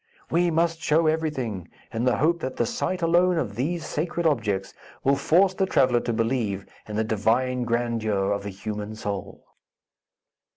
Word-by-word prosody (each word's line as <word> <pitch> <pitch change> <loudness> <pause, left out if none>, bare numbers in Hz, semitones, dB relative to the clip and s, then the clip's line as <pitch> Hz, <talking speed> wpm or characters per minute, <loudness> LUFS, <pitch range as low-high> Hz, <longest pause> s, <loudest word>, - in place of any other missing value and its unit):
"We 175 +1 +3
must 165 0 +1
show 160 +1 +3
everything, 135 - -1 0.2
in 115 +2 -1
the 125 - +3
hope 170 +4 +2
that 130 -4 -4
the - - +1
sight 185 -7 -2
alone 175 +1 +4
of 115 -10 -1
these 160 +6 -2
sacred 170 +3 -2
objects 105 -10 0 0.3
will 140 +1 +4
force 185 +7 +3
the 190 0 0
traveller 130 -7 +3
to 120 - -2
believe 115 -4 -1 0.2
in 105 - -5
the 110 - +1
divine 120 +4 +1
grandeur 115 -4 0
of 100 - 0
the 100 - -5
human 105 +2 -5
soul." 100 -2 -5
125 Hz, 165 wpm, -25 LUFS, 110-165 Hz, 0.3 s, alone